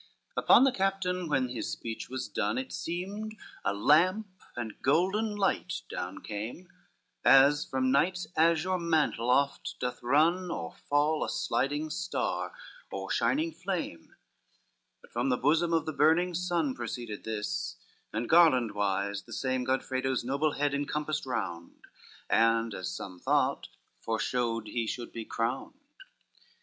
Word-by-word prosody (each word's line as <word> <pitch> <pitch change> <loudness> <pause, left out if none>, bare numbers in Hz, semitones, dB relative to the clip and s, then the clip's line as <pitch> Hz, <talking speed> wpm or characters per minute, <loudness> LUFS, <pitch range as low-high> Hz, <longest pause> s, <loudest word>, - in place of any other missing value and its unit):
XX - - -1
Upon - - +7
the 270 - +5
captain, 190 -4 -1
when 135 -3 +1
his 120 - -4
speech 115 -1 -5
was 130 0 -4
done, - - -1
It 260 0 -4
seemed 200 +6 -4 0.3
a 100 - +1
lamp 165 - +4 0.3
and 115 -3 -6
golden 190 +9 +2
light 195 -2 0
down 90 +1 -5
came, 110 - -6 0.6
As 140 +2 +6
from 130 -1 0
night's 180 +7 +2
azure 170 +3 +3
mantle 155 -8 +1
oft 140 +2 +1
doth 125 0 -3
run 165 +8 +3
Or 80 - -4
fall, 150 +2 +1
a - - -3
sliding 145 +3 -1
star, 185 +4 -2 0.4
or - - -4
shining 320 +4 +1
flame; 180 - -5 0.9
But - - -18
from 120 +3 0
the 125 - +2
bosom 160 +6 +2
of 165 -2 +2
the 155 - -3
burning 165 +5 +3
sun 170 -5 0
Proceeded 120 -3 -5
this, 105 - -3 0.4
and 115 +2 -2
garland 140 -10 +5
wise 100 0 -1
the - - -15
same 130 -1 -1
Godfredo's 130 0 -1
noble 140 +4 0
head 145 0 0
encompassed 150 +1 -2
round, 85 -9 -4 0.5
And, 115 0 +3
as 95 - -4
some 90 -2 -7
thought, - - +1 0.3
foreshowed 115 0 -1
he 115 +1 -2
should 120 +1 -4
be 115 -1 -6
crowned. 125 - -3
140 Hz, 140 wpm, -30 LUFS, 115-175 Hz, 0.9 s, Upon